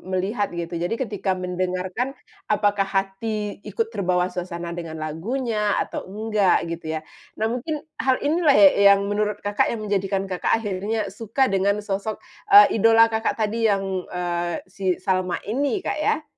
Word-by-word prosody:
melihat, 200 +3 0
gitu. 170 0 -4
Jadi 175 +6 -1
ketika 210 -6 -3
mendengarkan, 185 +7 -3 0.3
apakah 205 -1 +2
hati 200 +2 -2
ikut 225 +3 -2
terbawa 180 -3 0
suasana 175 -1 -5
dengan 165 -2 -6
lagunya 210 - -1
atau - - -5
enggak, 210 -1 +1
gitu 160 -1 -4
ya. - - -3 0.4
Nah, 220 - -1
mungkin 300 +5 -4 0.2
hal 260 -1 +3
inilah 305 -1 +3
ya 295 - +9 0.3
yang 200 - -2
menurut 210 0 -1
Kakak 205 0 +1
menjadikan 195 -2 -1
Kakak, 190 +3 0
akhirnya 210 0 -3
suka 230 +4 0
dengan 195 +1 +2
sosok, 200 +2 -3 0.3
eee, 405 - +7
idola 225 +1 +6
Kakak 220 +1 0
tadi, 225 +1 +1
yang, 195 -1 +1 0.2
eee, 175 -1 -3
si 190 +1 -11
Salma 185 -1 -1
ini, 280 - -1
Kak, - - -2
ya? 305 - 0
205 Hz, 150 wpm, -23 LUFS, 185-225 Hz, 0.4 s, ya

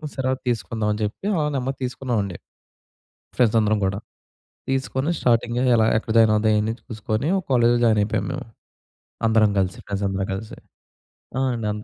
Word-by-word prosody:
సరే 130 -1 -2
అది 130 - -7
తీసుకుందాం 110 -2 -1
అని 105 - -5
చెప్పి 105 - -4
ఆల 150 -1 +1
నెమదిగా 135 +1 -2
తీసుకున్నామండి. 120 -7 -2 1.0
ఫ్రెండ్స్ 115 -2 +3
అందరం 105 0 +2
కూడా, 100 +1 -1 0.7
తీసుకొని 135 +3 -1
స్టార్టింగ్ 120 0 +1 0.2
ఎలా 110 0 +4
ఎక్కడ 110 0 -2
జాయిన్ 110 -1 +6
అవుదాం 110 0 +2
అని 110 +1 -1
చూసుకొని 110 +3 -3
ఒక 185 - -5
కాలేజ్‌లో 120 -1 +4
జాయిన్ 110 -2 +4
అయిపోయాము 100 -2 -1
మేము. - - -5 0.8
అందరం 110 -1 +4
కలిసి 95 -1 0
ఫ్రెండ్స్ 100 0 -3
అందరం 95 0 -2
కలిసి 110 +3 -7 0.8
ఆ! - - +1
అండి. 115 -2 -3
అన్ 105 +1 -5
110 Hz, 160 wpm, -23 LUFS, 105-125 Hz, 1.0 s, జాయిన్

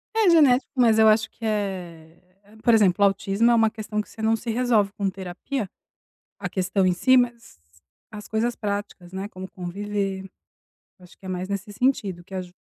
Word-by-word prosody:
É 440 -4 +4
genético, 285 -6 +4
mas 230 -4 +4
eu 220 - +7
acho 220 +1 +4
que 225 - -9
é 180 -6 -4 0.4
por 235 - +5
exemplo, 200 -3 +4
autismo 200 +3 +2
é - - +5
uma 225 -1 +4
questão 215 -1 -4
que - - -13
você 220 - -11
não 220 +1 +3
se 235 - -7
resolve 225 -4 +2
com 200 -1 -1
terapia, 190 +5 -5 0.7
a - - -3
questão 190 +1 0
em 185 - +3
si, 255 +8 +4
mas 235 - -1 0.5
as 210 -1 -9
coisas 230 +2 -1
práticas, 200 -4 -5
né, 190 +1 -4
como 190 -2 -9
conviver. 195 +1 -4 0.8
Acho 180 -1 -17
que 195 - -17
é - - -6
mais 185 0 -3
nesse 200 +1 -4
sentido 200 -7 0
que 195 - -14
aju 180 -1 -5
205 Hz, 185 wpm, -24 LUFS, 190-225 Hz, 0.8 s, eu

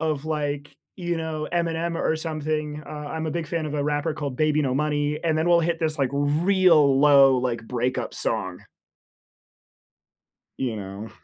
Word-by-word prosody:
of, 155 -2 -1
like, 145 -2 -3 0.2
you 175 -2 -2
know, 160 -1 -4
Eminem 170 -1 -1
or 160 - +1
something, 155 -1 -3
uh, - - -11
I'm 150 +2 -5
a 155 - -2
big 170 0 -3
fan 160 +1 -2
of 150 - -5
a 145 - 0
rapper 145 +2 -1
called 140 -4 -5
Baby 155 0 +2
No 130 -2 0
Money, 150 0 0
and 160 -1 +2
then 160 +2 +1
we'll 170 -1 +5
hit 170 0 0
this, 155 -1 0
like, 135 -2 +1
real 150 0 +4
low, 140 -3 +6
like, 120 -2 -2
breakup 125 +1 -2
song. - - -2 2.0
You 120 -4 -2
know? 100 +2 -7
150 Hz, 170 wpm, -24 LUFS, 140-160 Hz, 2.0 s, low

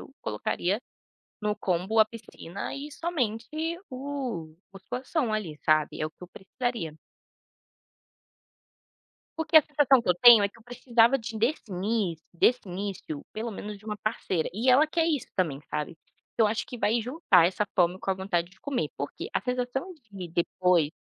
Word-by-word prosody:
eu - - -12
colocaria 180 - -1 0.6
no 210 0 0
combo 190 +2 0
a 215 - +8
piscina 215 -4 -8
e 290 +2 -7
somente 250 -10 -2 0.4
o 255 - -5 0.2
musculação 250 - -2
ali, 180 -8 -3
sabe, 155 -1 +2
é 155 - 0
o 155 - -5
que - - -48
eu - - -9
precisaria. 190 - -4 2.4
Porque 320 0 +2
a - - +3
sensação 275 -3 +4
que 235 - -7
eu 180 - +5
tenho 230 +3 +9
é 200 - +2
que 215 - -20
eu - - -19
precisava 245 +1 +3
de 225 -2 -6
desse 235 0 0
início 185 -3 -1
desse 240 +8 +3
início, 185 -5 -5
pelo 225 +2 -3
menos 210 0 -6
de 200 - -19
uma 210 -1 -4
parceira 190 -5 -1
e 230 +7 +2
ela 275 +5 +6
quer 325 +1 +1
isso 300 -5 0
também, 155 -7 0
sabe? 150 +2 -3 0.4
Eu 225 - +6
acho 215 +2 -1
que 245 - -8
vai 230 +2 +2
juntar 225 - +4
essa 190 +3 -1
fome 180 0 +3
com 195 - -3
a - - +2
vontade 180 -2 -1
de 190 - -23
comer. 255 - -2
Por 140 - -4
quê? - - -6
A - - +1
sensação 250 +7 -2 0.2
de 190 -3 -7
depois 170 -1 +2
215 Hz, 175 wpm, -28 LUFS, 180-250 Hz, 2.4 s, tenho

